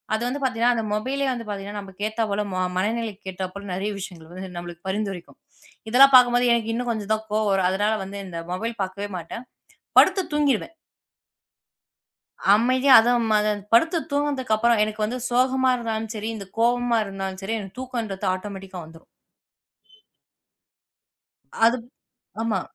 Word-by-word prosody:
அது 220 - -2
வந்து 275 +3 -3
பாத்தீங்கன்னா, 245 -1 +2
அந்த 225 - -1
மொபைலே 270 +6 -1
வந்து 235 -3 -7
பாத்தீங்கன்னா, 205 0 -5
நம்மளுக்கு 200 +1 -5
ஏத்தா 225 +1 -1
போல, 210 +1 0
ம - - -2 0.2
மனநிலையை 220 +1 -1 0.2
ஏத்தாபோல 190 +2 -6
நிறைய 200 +3 -2
விஷயங்கள் 175 -4 -9
வந்து 185 +1 -7
நம்மளுக்கு 175 0 -8
பரிந்துரைக்கும். 195 -3 -4 0.5
இதெல்லாம் 270 +3 +7
பார்க்கும்போது 245 0 +6
எனக்கு 225 -1 0
இன்னும் 245 +1 -2
கொஞ்சம் 215 -2 -4
தான் 220 0 -3
கோபம் 215 0 +1
வரும். 190 -2 +2
அதனால 205 +3 +1
வந்து 200 +1 -7
இந்த 170 -2 -6
மொபைல் 225 +5 -3
பாக்கவே 195 +2 -5
மாட்டேன். 175 +8 -7 0.5
படுத்துத் 380 -3 +3
தூங்கிருவேன். 295 +1 +1 1.8
அமைதியா 255 +4 +4
அதுவும் 235 -1 +1
அது 210 0 +2 0.2
படுத்துத் 325 +7 +3
தூங்குனதுக்கு 285 -5 0
அப்புறம் 230 0 +3
எனக்கு 215 0 -3
வந்து 250 +4 -4
சோகமா 260 +1 +2
இருந்தாலும் 225 -2 -3
சரி, 215 +1 -4
இந்த 200 -2 -8
கோவமா 240 0 +2
இருந்தாலும் 195 -1 -5
சரி 225 +3 -2
எனக்குத் 195 +3 -10
தூக்கம்ன்றது 230 -8 -4
ஆட்டொமேட்டிக்கா 190 -1 -8
வந்துரும். 165 +1 -16 2.6
அதுப் 235 0 +2 0.6
ஆமா. 225 -1 0
220 Hz, 145 wpm, -24 LUFS, 195-245 Hz, 2.6 s, இதெல்லாம்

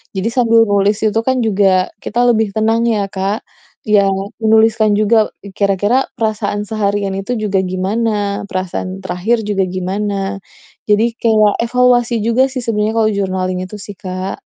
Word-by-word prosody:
Jadi 190 +3 -1
sambil 230 -2 +4
nulis 205 +1 +2
itu 220 0 +1
kan 260 +1 +1
juga 195 -4 +2
kita 235 - -2
lebih 220 -3 +1
tenang 225 +2 +1
ya, 210 -4 0
Kak. 195 +3 -2 0.4
Iya, 210 -2 +3 0.3
menuliskan 220 -1 +3
juga, 215 +1 +2 0.2
kira-kira 205 +6 +2
perasaan 215 -2 -2
seharian 200 -2 -1
itu 195 +5 -3
juga 210 -4 -1
gimana, 200 +2 -1
perasaan 185 0 -4
terakhir 185 +6 -1
juga 205 -3 0
gimana. 195 +2 -3 0.5
Jadi 225 +3 +1
kayak 215 -3 +3
evaluasi 245 -1 +2
juga 235 +4 +2
sih, 260 -1 -4
sebenarnya 220 -2 -1
kalau 220 -1 +3
journaling 185 -2 -2
itu 210 +3 -9
sih, 200 -1 -10
Kak. 185 0 -5
210 Hz, 145 wpm, -16 LUFS, 195-225 Hz, 0.5 s, sambil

